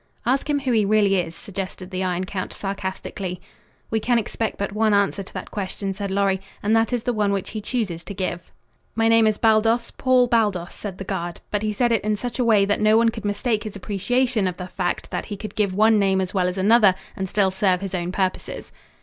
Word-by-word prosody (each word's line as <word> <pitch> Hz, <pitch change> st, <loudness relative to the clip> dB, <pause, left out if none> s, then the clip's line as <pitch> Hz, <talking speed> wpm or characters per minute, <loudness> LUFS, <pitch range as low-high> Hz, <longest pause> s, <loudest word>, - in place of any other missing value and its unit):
"Ask 265 Hz, +4 st, +1 dB
him 285 Hz, -1 st, +1 dB
who 265 Hz, -2 st, -1 dB
he 220 Hz, -3 st, +3 dB
really 200 Hz, -1 st, +3 dB
is," 170 Hz, -2 st, -2 dB
suggested 190 Hz, -1 st, -6 dB
the 185 Hz, 0 st, -2 dB
Iron 180 Hz, 0 st, -1 dB
Count 185 Hz, 0 st, -4 dB
sarcastically. 190 Hz, -2 st, -4 dB, 0.5 s
"We 220 Hz, -, +2 dB
can 240 Hz, +2 st, +2 dB
expect 225 Hz, 0 st, -2 dB
but 200 Hz, 0 st, -2 dB
one 215 Hz, 0 st, +2 dB
answer 200 Hz, 0 st, +1 dB
to 195 Hz, -, -11 dB
that -, -, -6 dB
question," 195 Hz, 0 st, -3 dB
said 200 Hz, 0 st, -4 dB
Lorry, 195 Hz, -1 st, +1 dB, 0.2 s
"and 215 Hz, +2 st, +3 dB
that 225 Hz, +1 st, +2 dB
is 245 Hz, -2 st, -1 dB
the 245 Hz, -, 0 dB
one 210 Hz, -2 st, +1 dB
which 195 Hz, -2 st, -2 dB
he 215 Hz, -, -4 dB
chooses 200 Hz, -8 st, -2 dB
to 200 Hz, -, -7 dB
give." 175 Hz, -2 st, -4 dB, 0.4 s
"My 225 Hz, 0 st, +2 dB
name 225 Hz, -1 st, +5 dB
is 215 Hz, -1 st, +1 dB
Baldos 225 Hz, +1 st, +3 dB
Paul 255 Hz, -1 st, +3 dB
Baldos," 210 Hz, -7 st, +1 dB
said 195 Hz, -3 st, -7 dB
the 195 Hz, -, -5 dB
guard, 175 Hz, -3 st, -4 dB
but 205 Hz, -, 0 dB
he 215 Hz, 0 st, 0 dB
said 240 Hz, +3 st, +1 dB
it 225 Hz, -, +2 dB
in 215 Hz, 0 st, +1 dB
such 245 Hz, +4 st, -5 dB
a -, -, +3 dB
way 215 Hz, -4 st, +4 dB
that 205 Hz, +1 st, 0 dB
no 215 Hz, +1 st, +5 dB
one 230 Hz, 0 st, +4 dB
could 225 Hz, -1 st, -7 dB
mistake 210 Hz, +2 st, 0 dB
his 215 Hz, -2 st, -7 dB
appreciation 215 Hz, +3 st, 0 dB
of 180 Hz, -1 st, -3 dB
the 180 Hz, -, -5 dB
fact 180 Hz, -1 st, -3 dB
that -, -, -3 dB
he 205 Hz, -, -5 dB
could 215 Hz, +2 st, -7 dB
give 210 Hz, -3 st, +1 dB
one 215 Hz, +1 st, +5 dB
name 195 Hz, -1 st, +2 dB
as 185 Hz, -1 st, -2 dB
well 185 Hz, -2 st, +2 dB
as 180 Hz, +1 st, -3 dB
another 205 Hz, 0 st, +5 dB, 0.2 s
and 190 Hz, -1 st, -3 dB
still 195 Hz, -1 st, +2 dB
serve 185 Hz, -1 st, +1 dB
his 195 Hz, -1 st, -5 dB
own 175 Hz, -1 st, -2 dB
purposes. 190 Hz, -1 st, -3 dB
205 Hz, 235 wpm, -23 LUFS, 190-225 Hz, 0.5 s, name